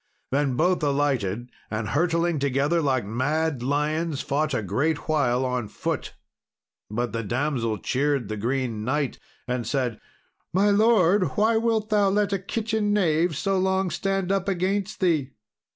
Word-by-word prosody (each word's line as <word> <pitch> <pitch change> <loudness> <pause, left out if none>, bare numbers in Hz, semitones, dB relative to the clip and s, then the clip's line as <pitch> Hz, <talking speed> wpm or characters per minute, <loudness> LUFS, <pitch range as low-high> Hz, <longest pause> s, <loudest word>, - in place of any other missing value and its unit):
Then 140 -1 +1
both 180 +6 +2
alighted, 130 -6 0 0.2
and, 110 -1 -3
hurtling 170 +1 +1
together 140 +4 +1
like 130 -7 +1
mad 140 +6 -1
lions, 150 +3 0
fought 150 0 0
a 110 - -1
great 145 - -1
while 130 -5 +2
on 125 -3 -2
foot. - - -4 0.7
But 120 +3 -2
the 115 - -1
damsel 120 0 -1
cheered 135 0 0
the 110 - -3
Green 115 0 -2
Knight, 140 +3 -1 0.3
and 125 -2 -2
said, 125 -5 -1 0.5
"My 200 +3 +4
lord, 200 - +3
why 220 +2 +3
wilt 225 -1 0
thou 205 -2 +4
let 205 0 +1
a 195 - 0
kitchen 215 +1 -1
knave 165 -5 +2
so 195 +3 0
long 190 -1 +1
stand 195 -1 -1
up 195 -1 0
against 195 +3 -1
thee?" 155 -7 +1
150 Hz, 150 wpm, -25 LUFS, 125-190 Hz, 0.7 s, My